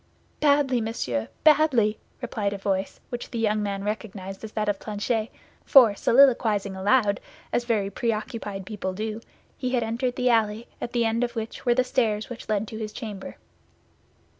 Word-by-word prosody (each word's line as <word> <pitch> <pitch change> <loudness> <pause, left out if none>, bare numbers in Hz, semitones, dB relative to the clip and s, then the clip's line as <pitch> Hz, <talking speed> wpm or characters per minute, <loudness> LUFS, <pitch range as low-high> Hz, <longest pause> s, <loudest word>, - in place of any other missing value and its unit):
"Badly, 280 -4 +3
monsieur, 125 - -2 0.2
badly!" 285 -9 +4 0.2
replied 210 -4 -1
a - - -4
voice 195 0 -2
which 245 -1 -5
the 235 - -5
young 215 -1 +1
man 200 -1 -2
recognized 200 -2 -5
as 220 - -6
that 215 -1 -1
of 205 -1 0
Planchet; 215 +1 -2 0.3
for, 245 -7 +7
soliloquizing 225 -5 +4
aloud, 205 +2 +2 0.3
as 240 - +1
very 210 -4 0
preoccupied 215 -3 -3
people 190 -2 -4
do, 215 +3 -4 0.4
he 255 0 -1
had 240 - +1
entered 240 +3 -1
the 250 0 +2
alley, 220 0 +1
at 240 - -4
the 235 -1 +2
end 225 +2 +1
of 240 0 -2
which 225 +2 -5
were 240 - +5
the 255 - +3
stairs 225 -4 0
which 245 - -8
led 215 0 0
to 220 - -7
his 215 -1 -4
chamber. 210 -5 -7
220 Hz, 170 wpm, -25 LUFS, 205-240 Hz, 0.4 s, for